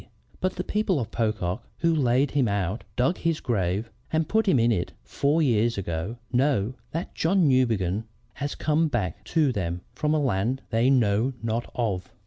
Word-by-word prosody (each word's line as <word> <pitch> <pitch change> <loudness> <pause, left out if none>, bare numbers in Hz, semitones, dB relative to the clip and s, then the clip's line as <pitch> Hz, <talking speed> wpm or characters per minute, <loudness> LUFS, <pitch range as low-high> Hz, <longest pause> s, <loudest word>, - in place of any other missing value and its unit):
But 185 0 -1
the 180 - -3
people 210 -6 0
of 115 -3 -4
Pocock, 105 -5 -1 0.2
who 165 -1 +3
laid 135 -2 +2
him 140 -4 +2
out, 100 +1 -1
dug 130 +9 +1
his 165 -2 0
grave, 105 0 -1 0.2
and 160 -1 +1
put 220 0 +1
him 185 - +5
into 115 -1 +3
it 85 - -4
four 150 +3 +1
years 115 -3 +2
ago, 90 +4 -3 0.2
know 125 -4 +2 0.2
that 165 +3 -4
John 175 0 +2
Newbegin 110 -6 +2 0.3
has 145 0 -4
come 155 +2 +2
back 100 - -2
to 155 +1 +2
them 90 -5 -3
from 150 +1 0
a - - +2
land 125 -1 0
they 115 +3 +3
know 120 -1 +3
not 115 +1 -2
of." 105 -7 -2
120 Hz, 175 wpm, -26 LUFS, 105-150 Hz, 0.3 s, him